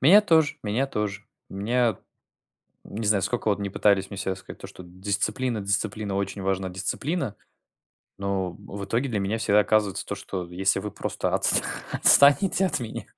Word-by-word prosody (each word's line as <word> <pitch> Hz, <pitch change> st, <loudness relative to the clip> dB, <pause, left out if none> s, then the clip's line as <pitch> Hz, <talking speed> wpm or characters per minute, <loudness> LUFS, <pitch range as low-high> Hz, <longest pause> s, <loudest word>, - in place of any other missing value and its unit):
Меня 185 Hz, +11 st, +7 dB
тоже, 160 Hz, -7 st, +2 dB
меня 110 Hz, +6 st, -1 dB
тоже. 105 Hz, -4 st, -4 dB, 0.3 s
Меня 115 Hz, +2 st, -1 dB, 0.9 s
Не 110 Hz, +2 st, -6 dB
знаю, 100 Hz, -2 st, +2 dB
сколько 115 Hz, +2 st, -2 dB
вот 100 Hz, -, 0 dB
ни 100 Hz, -, -3 dB
пытались 100 Hz, -1 st, +1 dB
мне 100 Hz, -, -8 dB
всё 95 Hz, 0 st, -2 dB
рассказать, 95 Hz, -, -9 dB
то -, -, -7 dB
что 90 Hz, -, -13 dB
дисциплина, 105 Hz, +6 st, -2 dB
дисциплина, 100 Hz, +1 st, -1 dB
очень 100 Hz, 0 st, -3 dB
важна 95 Hz, 0 st, -2 dB
дисциплина, 115 Hz, -, -3 dB, 0.8 s
но 100 Hz, -2 st, -2 dB
в 100 Hz, +2 st, -9 dB
итоге 120 Hz, +7 st, -1 dB
для 105 Hz, -3 st, -2 dB
меня 100 Hz, +3 st, -2 dB
всегда 105 Hz, -1 st, +3 dB
оказывается, 105 Hz, -1 st, 0 dB
то -, -, -4 dB
что, 90 Hz, -3 st, -6 dB
если 95 Hz, +2 st, 0 dB
вы 105 Hz, -, -6 dB
просто -, -, -4 dB
отс -, -, +6 dB, 0.3 s
отстанете 145 Hz, +7 st, +5 dB
от 150 Hz, -6 st, +1 dB
меня 115 Hz, -2 st, -6 dB
105 Hz, 170 wpm, -24 LUFS, 95-120 Hz, 0.9 s, Меня